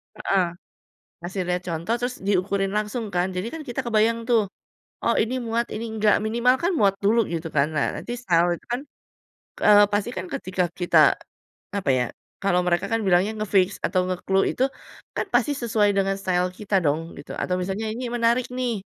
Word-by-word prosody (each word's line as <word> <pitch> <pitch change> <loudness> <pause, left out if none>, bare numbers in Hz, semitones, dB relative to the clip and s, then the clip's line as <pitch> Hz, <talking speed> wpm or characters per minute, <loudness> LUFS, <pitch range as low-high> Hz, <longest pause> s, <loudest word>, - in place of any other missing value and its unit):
Heeh, 190 -2 +1 0.8
kasih 185 +2 -3
lihat 180 0 -1
contoh, 170 +7 -1
terus 245 +1 -3
diukurin 195 0 0
langsung 215 +2 -1
kan, 180 +1 +1
jadi 185 +3 -3
kan 320 - -6
kita 255 -1 -4
kebayang 230 +1 +2
tuh. 220 -5 +2 0.5
Oh, - - +3
ini 235 +4 -2
muat, 230 +1 0
ini 225 +2 -4
nggak, 210 0 +4
minimal 235 +3 +3
kan 350 - +2
muat 195 -2 +4
dulu 225 +3 +4
gitu 165 -1 -3
kan. 140 +2 +4
Nah, 140 - +2
nanti 240 - -6
style 175 -3 +3
itu - - -28
kan, 245 - -1 0.9
eee, 205 0 +8
pasti 205 +3 +1
kan 185 0 -4
ketika 185 0 -1 0.2
kita 175 - +3 0.8
apa 180 - 0
ya, 125 - +2 0.4
kalau 180 -2 +3
mereka 175 +2 +1
kan 225 - +2
bilangnya 190 +4 +3
nge-fix 195 -2 +2
atau 185 -1 +1
nge-clue 190 +1 +1
itu 260 - +3 0.5
kan - - -1
pasti 295 - +3
sesuai 220 -5 +2
dengan 195 0 +1
style 180 -1 +1
kita 205 -2 0
dong 160 +3 0
gitu, - - -9
atau 180 - -1
misalnya 195 +4 -3
ini 245 +1 -4
menarik 240 +1 +2
nih, 245 -5 -2
200 Hz, 180 wpm, -24 LUFS, 180-230 Hz, 0.9 s, eee